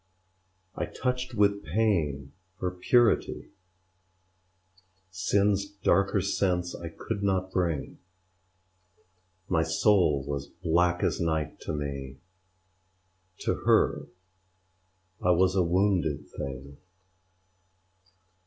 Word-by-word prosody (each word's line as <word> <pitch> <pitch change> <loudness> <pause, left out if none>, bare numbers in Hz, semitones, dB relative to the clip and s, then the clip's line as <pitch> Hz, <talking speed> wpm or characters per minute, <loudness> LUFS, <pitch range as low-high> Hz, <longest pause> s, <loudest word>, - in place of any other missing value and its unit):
I - - -2
touched 125 -1 -3
with 100 -1 +2
pain 75 -7 0 0.3
her 90 -1 -1
purity; 115 +6 +2 1.6
Sin's 100 +1 +1
darker 100 0 +1
sense 90 -2 0
I 85 - -7
could 100 +5 -5
not 95 -2 0
bring: 85 -6 -2 1.5
My 85 -3 +2
soul 80 -3 +3
was 70 -1 -4
black 85 +2 0
as - - 0
night 80 -3 -1
to - - -5
me: 70 -2 -5 1.2
To - - +1
her - - +3 1.1
I 90 - +1
was 90 +1 +4
a 95 - +4
wounded 90 -4 +1
thing. 70 +1 -7
90 Hz, 90 wpm, -28 LUFS, 75-100 Hz, 1.6 s, was